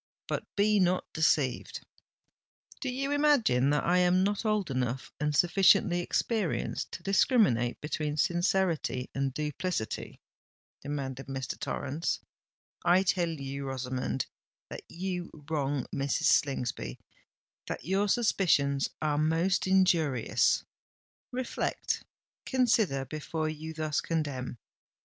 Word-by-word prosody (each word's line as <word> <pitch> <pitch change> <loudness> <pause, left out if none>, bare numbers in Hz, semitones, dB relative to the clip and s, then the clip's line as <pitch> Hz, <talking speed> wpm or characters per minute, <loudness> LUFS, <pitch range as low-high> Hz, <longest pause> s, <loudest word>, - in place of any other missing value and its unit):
But - - -2
be 210 0 +3
not 180 0 +2
deceived——" 150 -5 +1 1.0
"Do 270 - -3
you 275 +3 -2
imagine 280 - +3
that 150 -1 +2
I 180 +2 +3
am 180 +1 +4
not 205 +3 -1
old 210 -7 +1
enough 130 0 -2
and 150 0 0
sufficiently 180 +1 +4
experienced 200 +1 -1
to - - -7
discriminate 195 - +3
between 150 0 -2
sincerity 175 -6 +1
and 135 0 -1
duplicity?" 150 -2 -3 0.6
demanded 135 -2 -4
Mr. 135 -1 -4
Torrens. 155 +6 -2 0.6
"I 175 +2 +5
tell 180 -2 +1
you, 140 -3 -5
Rosamond, 130 -1 -2 0.5
that - - -6
you 180 0 -4 0.2
wrong 145 -3 0
Mrs. 140 0 -1
Slingsby—that 120 - -2
your 195 +4 +1
suspicions 160 - +2
are 150 -1 +1
most 165 +5 +1
injurious! 170 -9 +3 0.7
Reflect—consider 240 - -1
before 155 +2 -3
you 160 +1 -6
thus 155 -1 -1
condemn! 145 -7 -3
160 Hz, 105 wpm, -30 LUFS, 135-190 Hz, 1.0 s, I